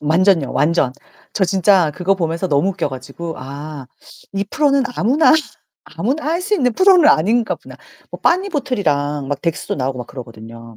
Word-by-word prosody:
완전요 165 0 +2
완전. 150 -5 +1 0.4
저 195 - +1
진짜 185 -2 +3
그거 185 +4 0
보면서 170 0 -2
너무 150 +6 +2
웃겨 185 -5 -2
가지고 145 +6 -7
아 140 +1 -8 0.5
이 200 +1 -1
프로는 280 -3 +2
아무나 280 +10 +4 0.5
아무나 275 +8 -3
할 335 +3 0
수 420 +3 0
있는 250 - +1
프로는 370 - +5
아닌가 220 - +2
보다. - - -14 0.3
뭐 - - -9
빠니보틀이랑 200 - 0
막 145 - -3
덱스도 165 -2 -2
나오고 130 -1 -3
막 120 - -6
그러거든요. 115 -2 -11
170 Hz, 350 characters per minute, -18 LUFS, -, 0.5 s, 프로는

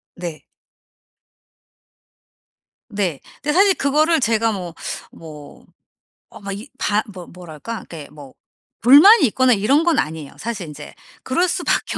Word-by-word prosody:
네. 170 -3 -8 2.4
네. 185 -8 -2 0.2
근데 295 - 0
사실 390 +3 +4
그거를 310 +4 +2
제가 225 -2 +1
뭐 180 -5 -6 0.4
뭐 150 -3 -13 0.6
어 - - -14
마 200 -1 -6
이 205 +7 -8
바 210 -3 0
뭐 180 -2 -10
뭐랄까 180 +5 -9
이게 155 -4 -10
뭐 145 -3 -14 0.5
불만이 295 - +7
있거나 255 +3 +2
이런 235 +9 +2
건 335 -3 +2
아니에요. 155 -2 -4
사실 210 -7 -5
인제 150 0 -10 0.3
그럴 345 +8 0
수밖에 355 0 -1
210 Hz, 230 characters per minute, -20 LUFS, -, 2.4 s, 불만이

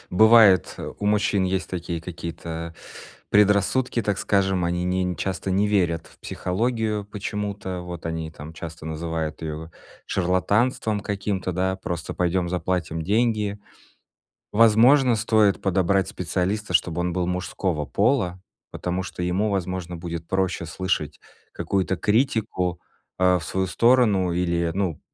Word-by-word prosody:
Бывает, 110 -1 +6
э, - - -5
у 100 - -1
мужчин 105 -1 +2
есть 95 0 -1
такие 85 -2 -4
какие-то 85 -1 -6 0.6
предрассудки, 105 +5 +3
так 105 -3 -1
скажем: 95 -3 +1
они 90 +1 -1
не 90 +1 0
не 90 -1 -2
часто 95 +3 -3
не 100 +2 +2
верят 85 -5 +1
в - - -20
психологию 110 +2 -1
почему-то. 100 -2 -4
Вот 90 -1 -7
они 80 -1 -3
там 75 0 -10
часто 80 -1 -8
называют 80 -1 -4
её 80 +1 -5 0.4
шарлатанством 100 +4 +1
каким-то, 100 -2 -2
да: 95 +1 0
"Просто 90 -3 -5
пойдём 90 0 0
заплатим 85 -2 -2
деньги". 105 +1 +1 0.9
Возможно, 115 +4 +5
стоит 110 -2 +2
подобрать 95 0 +2
специалиста, 95 +1 -2
чтобы 85 +1 +2
он 90 -1 -1
был 90 -1 0
мужского 90 -3 -2
пола, 100 -5 +1 0.3
потому 90 +1 -3
что 90 - -6
ему, 90 +5 +1
возможно, 90 -2 -3
будет 85 -1 -6
проще 95 -3 -1
слышать 80 -3 -2 0.3
какую-то 95 -1 -1
критику, 105 - 0 0.4
а, 90 0 +4
в 85 - -8
свою 95 0 -1
сторону 105 -4 +3
или, 85 -1 0
ну, 95 -6 -1
95 Hz, 135 wpm, -24 LUFS, 85-105 Hz, 0.9 s, Бывает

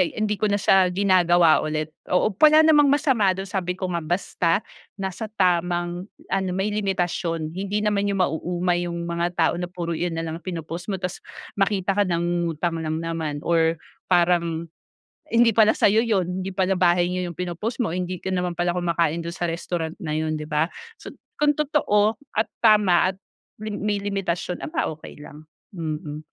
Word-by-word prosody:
hindi 210 -1 -1
ko 215 - +2
na 205 0 +1
siya 190 -2 +4
ginagawa 175 -4 +4
ulit. 155 0 -3 0.2
Oo, 180 +4 +2
wala 310 0 +7
namang 295 -2 +6
masama 245 -10 +2
dun 195 +1 -5
sabi 180 -2 -2
ko 185 0 -4
nga 170 - -1
basta 175 +2 0 0.3
nasa 195 +2 -4
tamang 175 0 0 0.2
ano 190 -1 0
may 195 +2 -1
limitasyon. 175 -5 -1
Hindi 200 +3 -2
naman 205 -1 +1
yung 195 -2 0
mauumay 175 +1 -1
yung 170 0 -4
mga 170 0 -1
tao 165 -2 +2
na 175 - -3
puro 175 -2 -4
iyan 170 0 -2
nalang 165 0 -4
pinopost 170 0 -6
mo, 195 - 0
tapos 180 0 -5 0.4
makita 195 -1 +1
ka 205 - +3
nangungutang 170 -1 -1
lang 155 0 -2
naman, 160 -3 -3
or 165 -1 +2 0.3
parang 170 -2 +2 0.6
hindi 235 0 +4
pala 220 0 +4
sa'yo 220 +3 +3
yun. 185 -4 0
Hindi 190 0 -5
pala 190 0 +1
bahay 175 0 +3
nyo 180 0 -2
yung - - -17
pinopost 180 - -3
mo, 220 - -1
hindi 180 0 -4
ka 190 - -3
naman 180 -1 -1
pala 175 +1 0
kumakain 170 -2 0
dun 170 - -5
sa 175 -2 -2
restaurant 165 -1 -4
na 155 -6 -4
yun, 155 0 -1
'di 150 - -6
ba? 155 +2 0 0.3
So, - - -8 0.3
kung 295 0 +3
totoo 225 -8 +2 0.2
at 220 - +1 0.2
tama 205 -5 +5
at - - -20 0.4
li 215 -1 -5
may 210 -1 -1
limitasyon, 195 -3 -3
aba 310 -1 -2
okey 155 - -12
lang, 150 +1 -11 0.3
mm. 155 -2 -5
180 Hz, 175 wpm, -23 LUFS, 170-200 Hz, 0.6 s, wala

